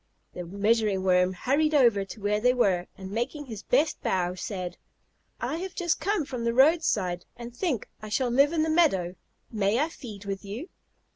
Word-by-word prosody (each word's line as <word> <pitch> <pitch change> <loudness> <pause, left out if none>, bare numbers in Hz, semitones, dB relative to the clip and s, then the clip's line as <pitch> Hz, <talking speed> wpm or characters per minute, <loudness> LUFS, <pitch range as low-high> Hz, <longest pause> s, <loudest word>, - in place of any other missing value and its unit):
The 180 - -5
Measuring 200 +2 +1
Worm 180 0 +3
hurried 295 +10 +1
over 235 -8 +4
to 195 +3 -10
where 205 +1 0
they 250 +3 +3
were, 185 -7 +2
and 190 0 -8
making 265 +7 -3
his 220 -5 -7
best 290 +8 +1
bow 180 -1 0
said: 185 -1 -5 0.6
"I 315 - -2
have 375 +2 -6
just 345 -2 0
come 365 -1 0
from 250 -4 -5
the 235 0 0
roadside 250 - +3
and 235 0 -9
think 285 - -1
I 215 - -7
shall 245 +3 0
live 280 +4 +4
in 320 -2 +1
the 320 - 0
meadow. 195 - +2 0.4
May 210 -1 +1
I 305 +5 +1
feed 215 - -10
with 195 -1 -4
you?" 225 - -7
230 Hz, 190 wpm, -27 LUFS, 195-290 Hz, 0.6 s, over